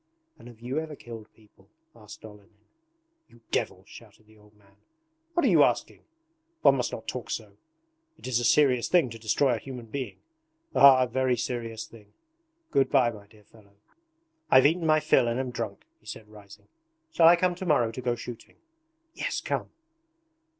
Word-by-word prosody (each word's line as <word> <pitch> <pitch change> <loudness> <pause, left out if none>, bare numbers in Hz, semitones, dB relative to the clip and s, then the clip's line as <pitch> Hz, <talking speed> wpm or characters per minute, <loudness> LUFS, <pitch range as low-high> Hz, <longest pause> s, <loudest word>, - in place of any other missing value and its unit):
'And - - -14
have 115 -2 -15
you 130 +5 -3
ever 160 -1 -7
killed 115 -4 -11
people?' 105 -2 -25 0.3
asked 110 -1 -13
Olenin. 105 0 -17 0.6
'You 120 - -22
devil!' - - -2
shouted 110 - -16
the 110 +1 -22
old 105 0 -23
man. 100 -1 -27 0.6
'What 345 - +2
are - - +4
you - - +6
asking? - - -1 0.6
One - - +6
must - - -2
not - - -8
talk - - -5
so. - - -5 0.7
It - - -14
is 125 -2 +1
a - - -3
serious 130 -2 +3
thing 165 -9 +2
to 115 - -9
destroy 120 +4 +1
a 115 - -2
human 125 -2 -9
being... 130 +3 -6 0.6
Ah, 135 -2 +7
a - - -1
very 130 0 0
serious 115 -2 -4
thing! 105 -3 -18 0.6
Good 135 - +2
bye, 130 -4 +3
my 105 -2 -13
dear 105 0 -21
fellow. 100 -1 -22 0.7
I've 130 0 +6
eaten 165 +2 +2
my 155 0 +4
fill 120 - +3
and 120 +2 -1
am 130 -1 -3
drunk,' 115 -5 -6
he 105 - -23
said 105 0 -9
rising. 105 -2 -16 0.4
'Shall 165 - +5
I 170 - +8
come 180 +1 +1
to 180 +2 -7
morrow 120 -8 +2
to 130 - -7
go 120 -1 -1
shooting?' 120 0 -10 0.6
'Yes, - - -3
come!' - - -3
120 Hz, 185 wpm, -27 LUFS, 110-130 Hz, 0.7 s, I